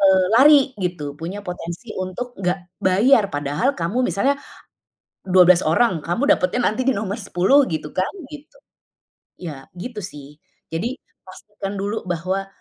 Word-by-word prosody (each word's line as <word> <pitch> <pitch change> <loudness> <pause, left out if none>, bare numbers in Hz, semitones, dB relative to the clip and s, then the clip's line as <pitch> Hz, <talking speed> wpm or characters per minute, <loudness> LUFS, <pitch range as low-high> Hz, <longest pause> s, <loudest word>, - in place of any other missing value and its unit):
eee 190 -1 +5
lari 285 +1 +8 0.2
gitu. 165 -6 -3
Punya 180 +5 -5
potensi 175 +5 -7
untuk 185 +7 -5
nggak 180 -1 -3
bayar 205 +4 +4
padahal 145 - 0
kamu 220 +10 0
misalnya, 275 +8 +1 0.9
12 180 -1 +6
orang 175 +2 +2
kamu 230 - 0
dapatnya 180 +7 0
nanti 255 +4 -2
di 265 - +3
nomor 205 +1 -3
10 195 +10 +3
gitu 155 -1 -4
kan, 185 +1 +1 0.2
gitu. 300 - -12 0.8
Ya 150 -7 -8
gitu 215 +4 -6
sih. 150 -5 -10 0.4
Jadi, 235 - -2 0.3
pastikan 200 +1 -8
dulu 205 +3 -3
bahwa 185 +3 -2
190 Hz, 140 wpm, -21 LUFS, 175-235 Hz, 0.9 s, lari